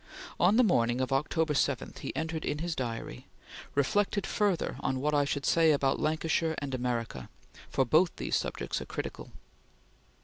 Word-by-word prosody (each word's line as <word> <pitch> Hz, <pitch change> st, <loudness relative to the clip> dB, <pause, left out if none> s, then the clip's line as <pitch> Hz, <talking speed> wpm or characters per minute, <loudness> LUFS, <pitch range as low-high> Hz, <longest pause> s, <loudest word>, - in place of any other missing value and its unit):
On 185 Hz, +4 st, +5 dB
the 250 Hz, -, +6 dB
morning 120 Hz, -, +2 dB
of 130 Hz, +1 st, 0 dB
October 150 Hz, +3 st, +1 dB
7, 135 Hz, -, 0 dB
he -, -, -5 dB
entered 160 Hz, 0 st, -3 dB
in 145 Hz, -, -1 dB
his 165 Hz, +1 st, -3 dB
diary: 115 Hz, -3 st, -5 dB, 0.5 s
"Reflected 200 Hz, +8 st, +1 dB
further 205 Hz, -5 st, 0 dB
on 130 Hz, -, -1 dB
what 150 Hz, +3 st, 0 dB
I 145 Hz, -1 st, +3 dB
should 140 Hz, 0 st, -2 dB
say 165 Hz, -1 st, +4 dB
about 140 Hz, -2 st, +1 dB
Lancashire 160 Hz, +1 st, 0 dB
and 140 Hz, -2 st, -4 dB
America, 120 Hz, -, -3 dB, 0.4 s
for 135 Hz, -, +1 dB
both 160 Hz, +8 st, +3 dB
these -, -, -2 dB
subjects -, -, -2 dB
are -, -, -6 dB
critical." -, -, -6 dB
150 Hz, 165 wpm, -30 LUFS, 130-165 Hz, 0.5 s, the